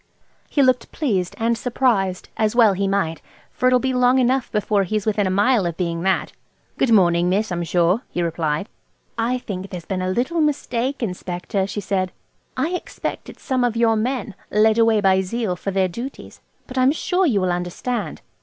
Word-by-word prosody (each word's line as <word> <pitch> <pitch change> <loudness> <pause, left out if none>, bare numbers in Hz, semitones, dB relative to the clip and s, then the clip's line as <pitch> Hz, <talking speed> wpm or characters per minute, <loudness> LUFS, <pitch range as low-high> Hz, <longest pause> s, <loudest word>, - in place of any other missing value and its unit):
He 285 - +3
looked 255 -2 +2
pleased 195 - -1
and 230 +1 +1
surprised, 225 -7 0
as 215 0 0
well 225 -4 +6
he 195 +1 -1
might, 165 -6 -1 0.3
for 255 - 0
it'll 255 0 +5
be 260 +1 -1
long 250 +1 +4
enough 255 0 +1
before 210 -1 +1
he's 205 +2 -1
within 210 -2 +1
a - - 0
mile 205 +1 +3
of 170 - -4
being 170 -2 -2
that. 190 +1 0 0.5
"Good 265 - +2
morning, 175 -4 +4
miss, 205 +2 0
I'm 175 0 -1
sure," 175 +5 +2
he 175 - -2
replied. 165 +1 -1 0.5
"I 235 +2 0
think 195 -5 -6
there's 175 -3 -7
been 190 -2 -3
a 185 - -1
little 260 - 0
mistake, 270 -3 -1
Inspector," 185 0 -3
she 205 +1 -4
said 185 -1 -1 0.5
"I 320 - +1
expect 360 0 -5
it's - - -13
some 260 -3 0
of 235 -2 0
your 230 -1 +3
men–led 220 -2 0
away 225 -2 +4
by 190 -1 +4
zeal 195 0 -2
for 190 - -5
their 190 -1 +1
duties. 235 +10 -8 0.2
But 255 0 -4
I'm 255 +1 +5
sure 360 +4 +1
you'll 195 - +1
understand. 180 +3 -3
210 Hz, 185 wpm, -21 LUFS, 185-250 Hz, 0.5 s, well